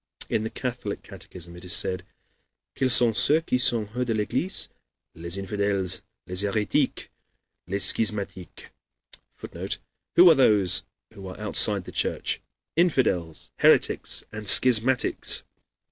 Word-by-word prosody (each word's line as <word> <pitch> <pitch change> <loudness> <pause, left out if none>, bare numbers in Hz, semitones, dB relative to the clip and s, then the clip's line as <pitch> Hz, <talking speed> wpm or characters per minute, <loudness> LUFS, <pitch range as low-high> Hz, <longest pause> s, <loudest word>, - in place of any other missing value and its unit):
In 110 - -1
the 110 - -3
Catholic 125 -5 -5
catechism 85 -1 -12
it 90 - -12
is 90 - -1
said: 90 -1 +1 0.7
"Quels 130 -1 +1
sont 120 -3 +4
ceux 155 +7 +4
qui 125 -6 -1
sont 115 -3 +1
hors 125 - 0
de 115 -3 -2
l'église? 140 - -2 0.5
Les 85 +3 -5
infidèles, 100 -1 -2 0.2
les 90 +1 -1
hérétiques, 105 +1 -1 0.6
les 100 +2 -3
schismatiques." 100 -4 -4 0.6
[Footnote: - - -6 0.4
"Who 180 +1 +8
are - - +5
those 100 - +3 0.3
who 100 -3 -10
are 95 - -10
outside 105 -2 +2
the - - -10
Church? - - -2 0.3
Infidels, 125 - 0
heretics, - - +2
and 105 -1 -6
schismatics." 125 +3 +4
105 Hz, 130 wpm, -25 LUFS, 95-125 Hz, 0.7 s, Who